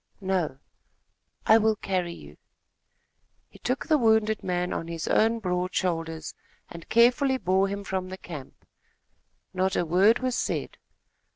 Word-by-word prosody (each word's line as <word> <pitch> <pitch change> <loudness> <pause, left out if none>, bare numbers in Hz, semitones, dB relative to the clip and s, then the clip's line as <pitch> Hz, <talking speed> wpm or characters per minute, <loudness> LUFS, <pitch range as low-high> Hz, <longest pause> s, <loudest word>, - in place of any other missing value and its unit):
"No." 185 -8 -1 0.9
"I 220 +1 +6
will 220 0 +2
carry 185 -4 -2
you." - - -14 1.1
He - - -17
took 255 +3 -2
the 310 -2 +3
wounded 220 -2 +2
man 180 -1 -1
on 165 - -4
his 165 -2 -5
own 225 +1 +3
broad 180 -3 -2
shoulders, 165 -3 -2 0.4
and 170 -1 -11
carefully 250 +3 +4
bore 190 -3 +2
him 200 +1 -4
from 190 -2 -3
the 190 - -7
camp. 150 -8 -10 0.9
Not 190 0 0
a 175 - +1
word 190 +7 +4
was 255 -1 -2
said. - - -3
190 Hz, 145 wpm, -26 LUFS, 175-220 Hz, 1.1 s, I